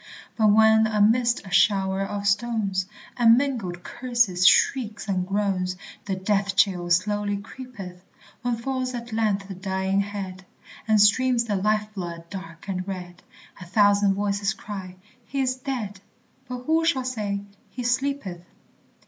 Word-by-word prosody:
But 220 -2 +3
when 220 +1 +5
amidst 225 +3 +2
a 190 - -10
shower 195 -1 +3
of 200 +1 -3
stones, 200 -3 0 0.3
And 230 -1 +6
mingled 225 -11 -2
curses, 235 -8 +1
shrieks, 220 +2 +3
and 185 -2 -1
groans, 195 -2 0 0.3
The 195 -2 -2
death 200 +1 0
chill 180 -3 +2
slowly 205 +3 +1
creepeth; 200 -5 -10 0.4
When 245 0 0
falls 255 +1 -3
at 235 -1 -7
length 210 -3 0
the 195 - -6
dying 190 +1 -1
head, 195 -2 -6 0.4
And 215 -1 +4
streams 240 +4 +4
the 215 -3 -2
life 210 +2 0
blood 170 -4 -6
dark 185 -3 -9
and 185 -1 -3
red, 180 -2 -7 0.4
A 185 - -9
thousand 205 0 +4
voices 200 +1 -1
cry, 190 -3 -7 0.3
"He's 265 -2 0
dead"; 245 -7 -5 0.5
But 250 0 -6
who 320 +4 +2
shall 275 -6 +1
say, 210 -5 -2 0.3
"He 250 - -6
sleepeth"? 245 -8 -1
205 Hz, 140 wpm, -25 LUFS, 190-235 Hz, 0.5 s, And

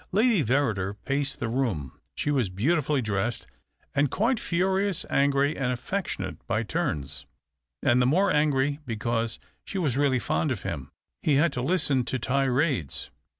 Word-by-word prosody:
Lady 215 -3 +3
Verrider 110 -7 +1
paced 140 0 -1
the 120 - -1
room. 110 - -1 0.2
She 145 - -1
was 130 -8 +1
beautifully 140 - +1
dressed 105 +2 -1 0.5
and 145 0 +2
quite 225 - +1
furious, 190 +2 +1
angry 140 +1 +3
and 125 -2 0
affectionate 125 - -3
by 110 +3 +1
turns, 75 - -2 0.6
and 120 +1 +4
the 125 - +4
more 185 +8 +3
angry 145 -1 +2
because 115 0 -1 0.3
she - - -5
was 145 -9 0
really 140 -2 +3
fond 150 +5 0
of 120 - -3
him. 70 -4 -4 0.3
He 150 - +3
had 150 +1 +3
to 125 - -2
listen 140 -3 +2
to 130 - -1
tirades. 130 - 0
135 Hz, 150 wpm, -27 LUFS, 115-150 Hz, 0.6 s, and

